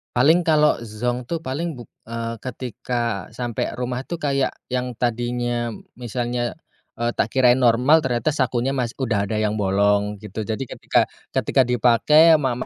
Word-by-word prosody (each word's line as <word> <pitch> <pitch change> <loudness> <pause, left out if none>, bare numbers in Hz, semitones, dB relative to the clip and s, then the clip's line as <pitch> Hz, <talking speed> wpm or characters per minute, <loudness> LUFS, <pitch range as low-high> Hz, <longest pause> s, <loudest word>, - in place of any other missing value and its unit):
Paling 160 +8 +4
kalo 150 -1 +4
zonk 120 +2 -3
tuh 165 -1 -3
paling 155 +5 -3
buk 120 -2 -12 0.2
eee, 115 0 -4
ketika 120 -4 -4
sampe 120 -2 -2
rumah 125 0 -3
tuh 170 - -3
kayak 140 -4 0 0.2
yang 125 -1 -2
tadinya 120 0 -1 0.3
misalnya 120 0 -2 0.4
eee, 120 0 -1
tak - - 0
kirain 125 -1 +3
normal 125 +6 +5
ternyata 130 +1 0
sakunya 130 -3 0
masih 125 -3 -2
udah 110 -6 -1
ada 110 - -2
yang 110 0 0
bolong 100 +1 +2
gitu. 105 +1 -6
Jadi 115 +3 -4
ketika - - +1 0.3
ketika 130 -2 +2
dipake 125 +7 +5
ama 140 -6 +3
ma - - -13
120 Hz, 155 wpm, -22 LUFS, 115-130 Hz, 0.4 s, normal